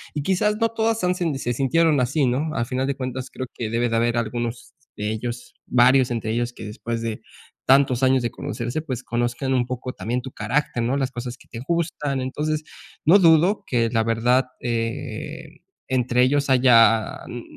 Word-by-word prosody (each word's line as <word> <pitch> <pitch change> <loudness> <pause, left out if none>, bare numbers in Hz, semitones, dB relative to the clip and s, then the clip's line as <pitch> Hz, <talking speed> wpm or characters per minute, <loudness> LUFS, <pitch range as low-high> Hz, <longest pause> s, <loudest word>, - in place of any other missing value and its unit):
Y 150 - -2
quizás 200 +5 +1
no 230 0 +2
todas 225 -1 0
han, 180 0 +2
se 150 -9 -2
sintieron 150 +4 +2
así, 135 +4 +1
¿no? 135 +6 0
Al 115 - 0
final 130 +2 -2
de 140 - -1
cuentas, 130 -1 -5
creo 130 - -5
que 115 -3 -4
debe 115 +2 +1
de 115 - -1
haber 120 +1 +1
algunos 120 +1 -3 0.2
de 105 +1 -2
ellos, 120 +2 -5
varios 125 +1 +4
entre 115 -2 -2
ellos, 120 +1 -1
que - - -9
después 115 +2 -5
de 115 -2 -4 0.5
tantos 135 -2 +4
años 130 -1 +3
de 120 - -1
conocerse, 140 0 -4
pues, 130 -6 -5
conozcan 120 +3 -1
un 125 -2 +1
poco 125 0 -5
también 120 +6 -3
tu 130 - -7
carácter, 145 -2 -1
¿no?, 125 +4 0
las 135 -2 -1
cosas 120 0 -6
que - - -21
te 115 - -8
gustan. 155 -5 -1
Entonces, 150 +4 -2 0.4
no 175 +7 +7
dudo 170 +3 +4
que 115 -2 +1
la 115 -2 +2
verdad, 120 +3 +2
eh, 115 -1 -4 0.3
entre 125 -1 +2
ellos 140 +2 +1
haya, 115 -4 +5
n 120 -1 -7
125 Hz, 190 wpm, -23 LUFS, 120-140 Hz, 0.5 s, no